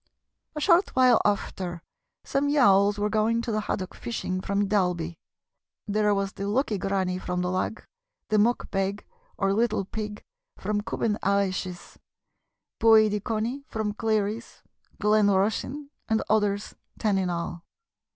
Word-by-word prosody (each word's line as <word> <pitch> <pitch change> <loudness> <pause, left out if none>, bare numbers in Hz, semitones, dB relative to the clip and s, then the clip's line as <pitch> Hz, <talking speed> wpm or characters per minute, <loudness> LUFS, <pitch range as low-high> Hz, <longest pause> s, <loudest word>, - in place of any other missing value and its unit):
A - - -2
short 345 +4 +3
while 255 -2 +5
after 185 -4 -2 0.4
some 280 +1 0
yawls 205 -8 +4
were 205 0 +1
going 220 +2 +1
to 235 - -3
the 215 - 0
haddock 190 -3 -3
fishing 185 -5 -4
from 200 +1 0
Dalby. 180 -5 0 0.7
There 210 0 +2
was 195 +1 -2
the 200 - -4
'Lucky 215 -1 0
Granny' 190 -2 -1
from 180 -1 -2
the 180 - -1
Lagg, 185 +4 -2 0.4
the 215 -1 +3
Muck 235 +4 +1
Beg, 195 +1 -1 0.3
or 195 -1 +1
Little 220 -2 +1
Pig, 210 +1 -6 0.3
from 210 0 -1
Cubbon 215 -1 -1
Aalish's, 190 -2 -1 0.8
Boid 220 -1 +6
y 210 - 0
Conney 230 +6 -2
from 215 -2 -2
Cleary's, 220 0 -2 0.4
Glen 210 0 +4
Rushen, 220 +9 0 0.2
and 220 0 +2
others, 205 -1 +1 0.2
ten 205 -3 +1
in 185 -1 0
all. 170 0 -4
205 Hz, 140 wpm, -26 LUFS, 195-220 Hz, 0.8 s, Boid